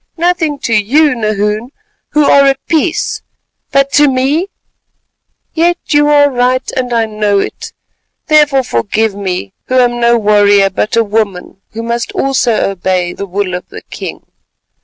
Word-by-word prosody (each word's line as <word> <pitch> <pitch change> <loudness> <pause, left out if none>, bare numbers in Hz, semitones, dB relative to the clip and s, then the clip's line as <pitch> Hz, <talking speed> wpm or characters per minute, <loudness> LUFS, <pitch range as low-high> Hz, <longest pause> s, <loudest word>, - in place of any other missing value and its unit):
"Nothing 335 -3 0
to 230 - 0
you, 260 +8 +3
Nahoon, 215 0 -2 0.4
who 300 0 +3
are 280 0 +5
at 270 0 0
peace, 325 +1 -1 0.5
but 275 0 +2
to 295 0 +4
me? 275 +7 0 1.1
Yet, 345 +2 +1
you 295 -1 +3
are 290 -1 +4
right, 255 +1 0
and 250 -1 -2
I 230 -1 +1
know 210 -2 -1
it, 195 - -4 0.5
therefore 295 -3 +3
forgive 215 - -1
me, 185 - -4
who 255 - -1
am 245 -1 +2
no 235 0 +3
warrior, 205 -2 +3
but 210 +4 -2
a 230 - +3
woman 200 -3 -3
who 225 +1 -5
must 235 0 -3
also 250 -6 0
obey—the 185 0 -2
will 190 0 -3
of 180 - -6
the - - -10
king." - - -7
235 Hz, 150 wpm, -12 LUFS, 205-280 Hz, 1.1 s, are